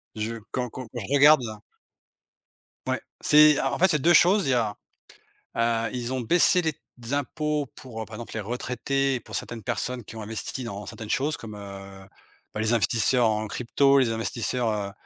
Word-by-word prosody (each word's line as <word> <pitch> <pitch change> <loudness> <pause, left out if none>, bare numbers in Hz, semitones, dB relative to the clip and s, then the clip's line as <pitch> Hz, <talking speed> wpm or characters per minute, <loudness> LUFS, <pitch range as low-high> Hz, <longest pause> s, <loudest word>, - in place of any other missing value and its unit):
je 110 +2 -3 0.2
quand 125 -1 -2
quand 130 - -7
quand 120 - -4
je 115 +6 -4
regarde 145 0 +7
là. 110 -2 -6 1.3
Ouais. - - -1 0.2
C'est 150 -1 +6
en - - -1
en - - -3
fait, 190 - +6
il - - +1
y - - +3
a - - +2
2 170 +6 +4
choses, 190 +3 +5
il - - +2
y - - +3
a, 110 -4 0 0.8
heu, 115 -1 +1
ils 125 0 -3
ont 130 - -1
baissé 175 +8 +4
les 160 -2 -1
t - - -35 0.3
impôts 150 +1 -1
pour, 115 -4 -7
par 110 - -10
exemple, 115 +2 -8
les - - -2
retraités 125 +5 -1
et 125 - -2
pour - - -10
certaines 115 -2 -5
personnes 125 -2 -3
qui 110 - -11
ont 110 - -6
investi 110 +4 -5
dans 105 -3 -6
certaines 110 +2 -8
choses 145 +5 0
comme, 110 -2 -9
heu, 100 -1 -10 0.5
bah, 105 - -3
les 110 +2 +1
investisseurs 115 +3 +3
en 110 0 -1
crypto, 135 +5 +2
les 125 -4 +2
investisseurs, 115 +1 -1
heu, 105 -2 -2
120 Hz, 205 wpm, -26 LUFS, 110-135 Hz, 1.3 s, regarde